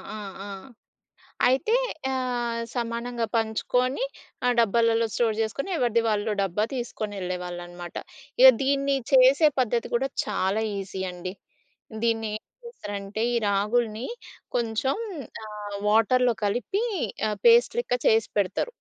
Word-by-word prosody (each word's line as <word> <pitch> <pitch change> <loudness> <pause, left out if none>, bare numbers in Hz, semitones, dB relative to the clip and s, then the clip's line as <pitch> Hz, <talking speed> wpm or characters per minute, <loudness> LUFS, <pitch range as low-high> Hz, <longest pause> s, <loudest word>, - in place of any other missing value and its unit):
ఆ! - - -5 0.3
ఆ! - - -7 1.0
అయితే, 305 - +2 0.4
ఆహ్, 245 -3 -1
సమానంగా 235 0 -2
పంచుకోని, 250 - 0 0.4
ఆ - - +4
డబ్బాలలో 230 +1 +3
స్టోర్ 225 -2 +1
జేసుకొని, 225 - -2
ఎవరిది 235 -3 +2
వాళ్ళు 210 +1 0
డబ్బా 195 +2 0
తీసుకొనెళ్ళేవాళ్ళనమాట. 180 -6 -5 0.4
ఇగ 260 +1 +11
దీన్ని 275 0 +2 0.2
చేసే 270 +4 +6
పద్ధతి 240 -1 0
కూడా 265 +3 +1 0.2
చాలా 200 0 0 0.2
ఈజీ 190 -1 -5
అండి. 180 +1 -6 0.7
దీన్ని 225 -1 +1
ఏం - - -41 0.2
చేస్తారంటే, 205 - -5
ఈ - - +2
రాగులుని 215 +3 0 0.5
కొంచం 235 - 0 0.5
ఆహ్, 210 -1 -6
వాటర్‌లో 235 +3 +4
కలిపి 250 - 0 0.5
ఆహ్, 210 - -4
పేస్ట్ 470 +1 +6
లెక్క 250 - 0
చేసి 220 0 +3
పెడతారు. 200 - 0
230 Hz, 115 wpm, -26 LUFS, 205-255 Hz, 1.0 s, ఇగ